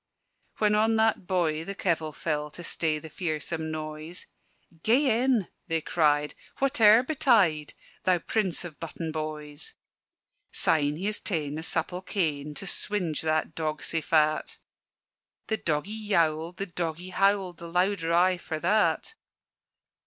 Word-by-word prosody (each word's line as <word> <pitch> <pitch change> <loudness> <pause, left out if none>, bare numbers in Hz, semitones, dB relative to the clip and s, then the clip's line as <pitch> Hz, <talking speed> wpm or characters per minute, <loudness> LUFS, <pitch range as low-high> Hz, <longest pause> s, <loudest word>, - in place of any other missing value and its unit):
When 210 -1 +3
on 220 +1 +3
that 220 -4 +2
boy 165 -4 +1
the 200 +4 -6
kevil 160 -5 0
fell 150 -1 -2
To 175 +4 -10
stay 160 -2 0
the 150 - -8
fearsome 160 -1 -3
noise, 155 +2 -6 0.6
"Gae 240 - +3
in," 245 -8 +2 0.2
they 165 -2 +1
cried, 150 -2 +1 0.2
"whate'er 240 -4 +5
betide, 220 - +2 0.3
Thou 185 -1 +4
prince 185 -1 0
of 165 -4 -9
button 165 0 -5
boys!" 155 -1 -5 0.8
Syne, 145 -2 +2
he 180 +5 -5
has 210 0 0
taen 150 -7 -2
a - - -4
supple 175 +2 -2
cane 150 -6 -2
To 195 - -5
swinge 180 -4 0
that 155 0 0
dog 155 -1 -3
sae 165 - 0
fat: 155 -1 +1 0.9
The 220 - -1
doggie 155 +3 -1 0.2
yowled, 165 -2 +1
the 195 - -1
doggie 175 0 -4
howled 195 -2 +2
The 170 - -8
louder 180 0 +1
aye 180 +2 +4
for 160 -2 -4
that. 215 - +2
170 Hz, 140 wpm, -27 LUFS, 155-195 Hz, 0.9 s, whate'er